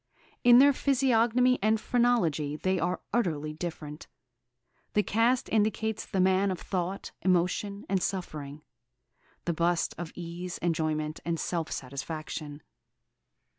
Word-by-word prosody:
In 240 0 +8
their 280 +2 +7
physiognomy 255 -2 +3
and 215 +2 +3
phrenology 190 - +1
they 185 +4 0
are 180 - -1
utterly 155 -10 0
different. 155 -2 -6 0.9
The 210 - +3
cast 235 +5 +2
indicates 220 0 0
the 195 - -2
man 190 +2 +3
of 185 -3 -3
thought, 185 +1 -3
emotion, 185 +3 0
and 190 -1 0
suffering; 155 -6 -4 0.8
the 170 - 0
bust, 170 +1 +1
of 175 -2 -5
ease, 175 +1 -6
enjoyment, 155 -2 -1
and 165 -1 -2
self 165 -3 -2
satisfaction. 145 +2 -6
180 Hz, 120 wpm, -29 LUFS, 155-220 Hz, 0.9 s, In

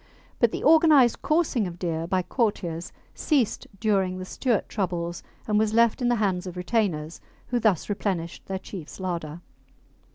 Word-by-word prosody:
But 235 -2 +4
the - - -4
organised 305 -6 +5
coursing 305 - +1
of 175 -1 -8
deer 165 -2 -2
by 185 0 +1
courtiers 175 -8 -2 0.2
ceased 275 -9 0
during 195 -4 +1
the 185 - -6
Stuart 235 +2 -1
troubles, 175 -4 -3 0.3
and 210 -1 +2
was 215 0 +1
left 235 +2 +3
in 245 - +2
the 240 - +3
hands 190 -4 0
of 180 0 -7
retainers, 180 -6 -1 0.3
who 245 - +1
thus 210 -7 +2
replenished 190 -5 -3
their 190 - -2
chief's 190 -3 -9
larder. 170 -3 -4
195 Hz, 160 wpm, -26 LUFS, 175-230 Hz, 0.3 s, organised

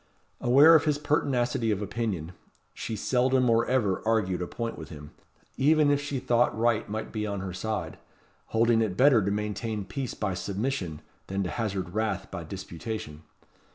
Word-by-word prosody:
Aware 140 +7 +7
of 160 -2 +5
his 150 -2 +2
pertinacity 130 -5 0
of 105 -3 +1
opinion, 105 -6 -3 0.4
she 110 - -5
seldom 125 +3 +2
or 115 0 +3
ever 110 -8 +1
argued 105 -5 +1
a 90 - -2
point 115 +4 -4
with 80 - -9
him, 75 -1 -10 0.5
even 150 +1 +4
if 145 0 +2
she 145 -1 -3
thought 120 -4 +1
right 115 -2 +1
might 110 +1 -4
be 105 -1 -3
on 100 -2 -3
her 95 -1 -5
side; 95 -3 -4 0.5
holding 115 0 +3
it 100 -5 -1
better 130 -5 +5
to 100 - 0
maintain 105 0 -3
peace 130 +6 -4
by 100 -3 -2
submission, 95 - -3 0.2
than 95 +1 -1
to 90 - -3
hazard 95 -6 -3
wrath 110 +1 -2
by 85 -3 -5
disputation. 85 -2 -6
110 Hz, 170 wpm, -27 LUFS, 95-125 Hz, 0.5 s, Aware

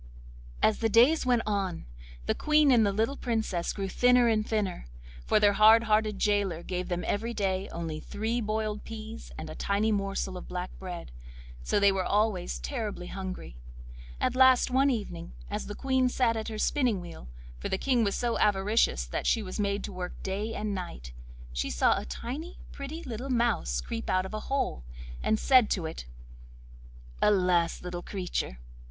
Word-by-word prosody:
As 215 - +3
the 225 - +1
days 250 +7 +5
went 245 -2 +3
on, 195 -4 -2 0.4
the - - +1
Queen 300 -2 +4
and 235 -3 +5
the 200 - +2
little 225 +7 0
Princess 220 -7 -1
grew 195 -1 -3
thinner 245 +4 +4
and 220 -2 +2
thinner, 210 - -2 0.4
for - - +4
their 205 -1 +5
hard 220 +2 +7
hearted 215 -1 +2
gaoler 200 -5 +1
gave 180 -1 -3
them 175 0 -2
every 230 +3 -2
day 190 -2 -1
only 165 -2 -4
three 225 +8 -2
boiled 215 -1 -2
peas 225 0 -8
and 160 - -6
a 155 - -7
tiny 205 +5 0
morsel 195 -2 -2
of - - -9
black 180 0 -4
bread, 180 - -7 0.5
so 60 - +1
they 200 0 +5
were 190 -1 0
always 205 -3 0
terribly 215 -9 -4
hungry. 185 - -6 0.6
At 255 - 0
last, 260 -1 +5
one 270 +2 +4
evening, 205 - -4 0.2
as - - -3
the 205 - -6
Queen 260 -1 +1
sat 245 -2 +1
at 220 -1 -3
her 220 - -5
spinning 245 -3 +1
wheel—for - - -9
the 190 - 0
King 250 +1 +2
was 200 -2 0
so 240 -1 -1
avaricious 200 - +2
that - - -3
she 225 - +2
was 185 +2 -6
made 200 0 0
to 200 - -6
work 180 -1 -5
day 205 +4 -3
and 210 -1 -2
night—she - - -6
saw - - +3
a - - -8
tiny, 275 - -6
pretty 295 +4 -7
little 250 +1 -5
mouse 235 - +1
creep 90 - -5
out 185 0 +2
of 190 - -8
a 215 - -2
hole, 270 - -1 0.4
and 220 - +2
said 255 -2 +5
to 180 -5 0
it: 160 - -6 1.1
'Alas, 180 -4 +2
little 175 -1 -5
creature! 180 - -3
205 Hz, 175 wpm, -29 LUFS, 180-230 Hz, 1.1 s, hard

